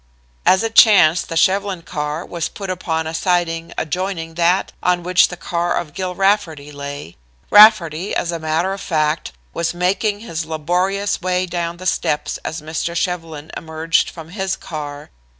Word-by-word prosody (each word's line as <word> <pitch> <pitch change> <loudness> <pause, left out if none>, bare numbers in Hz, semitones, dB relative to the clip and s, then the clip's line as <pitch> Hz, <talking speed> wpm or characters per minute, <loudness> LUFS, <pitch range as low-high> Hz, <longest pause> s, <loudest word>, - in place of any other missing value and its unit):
As 190 +3 +5
it 225 0 -2
chanced 185 -8 +6
the 165 - -2
Shevlin 190 0 +1
car 150 +2 -4
was 170 -2 -3
put 195 -2 -6
upon 160 -3 -2
a 160 - -4
siding 165 -2 0
adjoining 165 0 -3
that 175 +3 +1
on 180 -1 +1
which 180 +1 +4
the 175 - -8
car 175 0 -1
of 155 -4 -4
Gill 185 -1 -4
Rafferty 180 -7 0
lay. 140 - -8 0.3
Rafferty, 200 -5 +6
as 170 - -1
a 170 - -4
matter 160 +4 0
of 195 - -7
fact, 155 -1 -1 0.2
was 170 +1 -2
making 200 +4 0
his 170 -7 -4
laborious 180 +6 -1
way 185 0 0
down 170 -1 -3
the 185 - -10
steps 150 -4 -1
as 160 -1 -5
Mr. 160 +2 -3
Shevlin 165 -4 -3
emerged 160 +1 0
from 165 -2 -11
his 190 0 -2
car. 145 -2 -7
170 Hz, 165 wpm, -19 LUFS, 160-185 Hz, 0.3 s, chanced